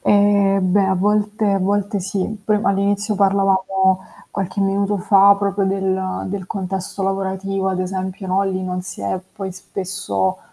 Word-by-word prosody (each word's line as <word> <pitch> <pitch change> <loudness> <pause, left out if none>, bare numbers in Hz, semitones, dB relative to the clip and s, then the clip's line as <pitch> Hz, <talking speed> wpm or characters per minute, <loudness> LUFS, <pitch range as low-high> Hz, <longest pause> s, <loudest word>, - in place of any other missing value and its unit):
Ehm, 200 -2 +3
beh 200 0 +4
a 190 - +2
volte 210 +2 +1
a 195 - +2
volte 200 +2 0
sì. 195 +3 -3
Poi 210 -1 +2
all'inizio 200 +1 +1
parlavamo 190 -1 +2 0.3
qualche 200 0 -3
minuto 200 +1 +1
fa, 200 +2 +6
proprio 200 -1 0
del 190 -1 -1
del 190 -1 -4
contesto 195 0 -4
lavorativo, 195 0 -1
ad 185 -1 -1
esempio, 185 +1 -4
no, 190 +2 +2
lì 190 -1 -2
non 180 0 -3
si 180 - -8
è 100 - -2 0.2
poi 190 -2 -4
spesso, 185 - -3
195 Hz, 155 wpm, -20 LUFS, 190-200 Hz, 0.3 s, fa